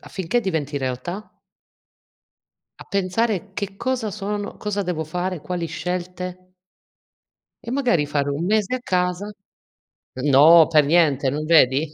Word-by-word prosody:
affinché 190 Hz, +6 st, -2 dB
diventi 160 Hz, -8 st, -2 dB
realtà 135 Hz, +10 st, -5 dB, 1.5 s
a -, -, -11 dB
pensare: 200 Hz, +1 st, -1 dB
"Che 200 Hz, 0 st, -5 dB
cosa 245 Hz, -3 st, -2 dB
sono, 205 Hz, 0 st, -4 dB
cosa 205 Hz, -1 st, -3 dB
devo 175 Hz, -4 st, -2 dB
fare, 180 Hz, +2 st, -4 dB
quali 175 Hz, +1 st, -4 dB
scelte?" 180 Hz, +2 st, -5 dB, 1.1 s
E 235 Hz, -, -6 dB
magari 245 Hz, -, +1 dB
fare 145 Hz, -1 st, -1 dB
un 150 Hz, +5 st, -2 dB
mese 215 Hz, +3 st, +1 dB
a -, -, -8 dB
casa 180 Hz, 0 st, -1 dB, 0.9 s
no, 150 Hz, +4 st, +7 dB
per 150 Hz, -3 st, +4 dB
niente, 145 Hz, -4 st, +3 dB
non 150 Hz, +3 st, -3 dB
vedi? 155 Hz, -2 st, +4 dB
180 Hz, 125 wpm, -22 LUFS, 155-200 Hz, 1.5 s, no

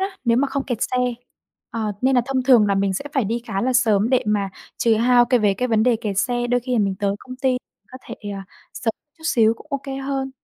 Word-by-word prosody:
á, 385 Hz, 0 st, -3 dB
nếu 235 Hz, 0 st, +3 dB
mà 275 Hz, +3 st, +2 dB
không 270 Hz, 0 st, -2 dB
kẹt 245 Hz, -4 st, -3 dB
xe. 255 Hz, -, -1 dB, 0.7 s
À, 230 Hz, -, -4 dB, 0.2 s
nên 265 Hz, 0 st, +3 dB
là 245 Hz, -, +5 dB
thông 265 Hz, -1 st, 0 dB
thường 245 Hz, -5 st, +5 dB
là 200 Hz, -, +2 dB
mình 195 Hz, 0 st, +1 dB
sẽ 190 Hz, -, -4 dB
phải 270 Hz, -7 st, +1 dB
đi 230 Hz, +3 st, -2 dB
khá 195 Hz, 0 st, -2 dB
là 255 Hz, +1 st, +1 dB
sớm 220 Hz, -2 st, +3 dB
để 255 Hz, -, +3 dB
mà 205 Hz, -2 st, +1 dB, 0.3 s
trừ 230 Hz, -1 st, +3 dB
hao 240 Hz, +2 st, +4 dB
cái 245 Hz, 0 st, +2 dB
về 205 Hz, -2 st, +3 dB
cái 250 Hz, +6 st, -2 dB
vấn 220 Hz, -2 st, +3 dB
đề 240 Hz, -1 st, +3 dB
kẹt 210 Hz, -4 st, -3 dB
xe, 240 Hz, +1 st, 0 dB
đôi 245 Hz, 0 st, +1 dB
khi 250 Hz, +1 st, -5 dB
là 240 Hz, -, +2 dB
mình 195 Hz, -2 st, +1 dB
tới 200 Hz, -1 st, 0 dB
công 255 Hz, +2 st, -10 dB
ty 260 Hz, -1 st, +1 dB, 0.4 s
có 255 Hz, -, -8 dB
thể, -, -, -6 dB
ờ, 200 Hz, -1 st, -5 dB, 0.3 s
sớm 230 Hz, -, -1 dB, 0.3 s
chút 320 Hz, -, -16 dB
xíu 225 Hz, -6 st, +3 dB
cũng 260 Hz, -, -16 dB
OK 280 Hz, -2 st, -3 dB, 0.2 s
hơn. 270 Hz, -1 st, -2 dB
240 Hz, 265 wpm, -22 LUFS, 210-260 Hz, 0.7 s, là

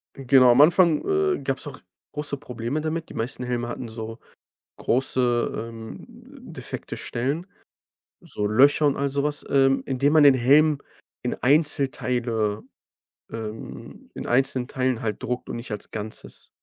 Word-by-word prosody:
Genau, 130 Hz, -2 st, +5 dB
am 120 Hz, +4 st, +6 dB
Anfang, 170 Hz, 0 st, +5 dB
äh, 390 Hz, -1 st, +1 dB
gab -, -, -1 dB
es -, -, -5 dB
auch -, -, -8 dB, 0.3 s
große 150 Hz, -1 st, -3 dB
Probleme 125 Hz, +3 st, -4 dB
damit. 160 Hz, +1 st, -3 dB
Die -, -, -10 dB
meisten 120 Hz, +2 st, -3 dB
Helme 120 Hz, -1 st, -2 dB
hatten 120 Hz, 0 st, -5 dB
so 110 Hz, +1 st, -7 dB, 0.6 s
große, 120 Hz, -3 st, 0 dB
ähm, 115 Hz, -1 st, -9 dB
m -, -, -14 dB
defekte -, -, -7 dB
Stellen, 140 Hz, +9 st, -3 dB, 0.7 s
so 105 Hz, -, -4 dB
Löcher 140 Hz, +8 st, +4 dB
und 140 Hz, -, +2 dB
all 140 Hz, 0 st, -1 dB
sowas 145 Hz, +2 st, -2 dB
ähm, 135 Hz, -1 st, +3 dB
indem 140 Hz, +2 st, +1 dB
man 155 Hz, -2 st, +7 dB
den 140 Hz, -2 st, +8 dB
Helm 145 Hz, +4 st, +4 dB, 0.4 s
in 125 Hz, -, -2 dB
Einzelteile 125 Hz, -7 st, 0 dB, 0.7 s
ähm, 110 Hz, -1 st, -8 dB
in -, -, -7 dB
einzelnen 130 Hz, 0 st, +1 dB
Teilen 130 Hz, -3 st, -1 dB
halt 110 Hz, -2 st, -3 dB
druckt 125 Hz, +1 st, -3 dB
und -, -, -4 dB
nicht 115 Hz, 0 st, -7 dB
als 105 Hz, -, -4 dB
Ganzes. 110 Hz, 0 st, -8 dB
130 Hz, 150 wpm, -24 LUFS, 120-145 Hz, 0.7 s, den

